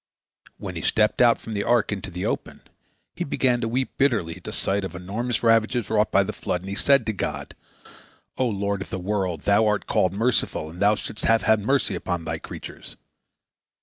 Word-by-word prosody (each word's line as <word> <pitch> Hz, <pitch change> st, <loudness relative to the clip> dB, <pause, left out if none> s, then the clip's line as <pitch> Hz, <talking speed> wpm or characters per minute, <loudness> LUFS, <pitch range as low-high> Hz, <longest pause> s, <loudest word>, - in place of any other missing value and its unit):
When -, -, -6 dB
he -, -, -4 dB
stepped 110 Hz, +1 st, +2 dB
out 120 Hz, -1 st, +5 dB
from 115 Hz, -, -7 dB
the 100 Hz, -, -1 dB
ark 120 Hz, -3 st, +2 dB
into 100 Hz, -1 st, -4 dB
the 90 Hz, 0 st, -4 dB
open, -, -, -3 dB, 0.5 s
he -, -, -2 dB
began 125 Hz, -2 st, +1 dB
to 115 Hz, -, -1 dB
weep 125 Hz, +3 st, -2 dB
bitterly 110 Hz, -12 st, +1 dB
at -, -, -6 dB
sight 100 Hz, +1 st, 0 dB
of 95 Hz, -3 st, -5 dB
the -, -, -6 dB
enormous 115 Hz, +6 st, -2 dB
ravages 115 Hz, 0 st, +2 dB
wrought 105 Hz, -1 st, +2 dB
by 100 Hz, -, +4 dB
the 105 Hz, +2 st, -4 dB
flood, 90 Hz, -, -3 dB
and 95 Hz, +1 st, -7 dB
he -, -, -3 dB
said 140 Hz, +6 st, +3 dB
to 110 Hz, -, -1 dB
God: 100 Hz, -, -4 dB, 0.8 s
"O 130 Hz, -, +1 dB
Lord 100 Hz, -1 st, -2 dB
of -, -, -6 dB
the -, -, -3 dB
world! 95 Hz, -4 st, -2 dB
Thou 100 Hz, +2 st, +3 dB
art 105 Hz, -1 st, 0 dB
called 95 Hz, -1 st, +1 dB
the -, -, -6 dB
Merciful, 110 Hz, -9 st, 0 dB
and 85 Hz, -, -11 dB
Thou 105 Hz, +1 st, +4 dB
shouldst 105 Hz, -, -5 dB
have 115 Hz, -3 st, +3 dB
had 110 Hz, +2 st, +4 dB
mercy 135 Hz, +7 st, +1 dB
upon 85 Hz, -2 st, -3 dB
Thy -, -, -3 dB
creatures." -, -, -10 dB
105 Hz, 215 wpm, -24 LUFS, 95-115 Hz, 0.8 s, out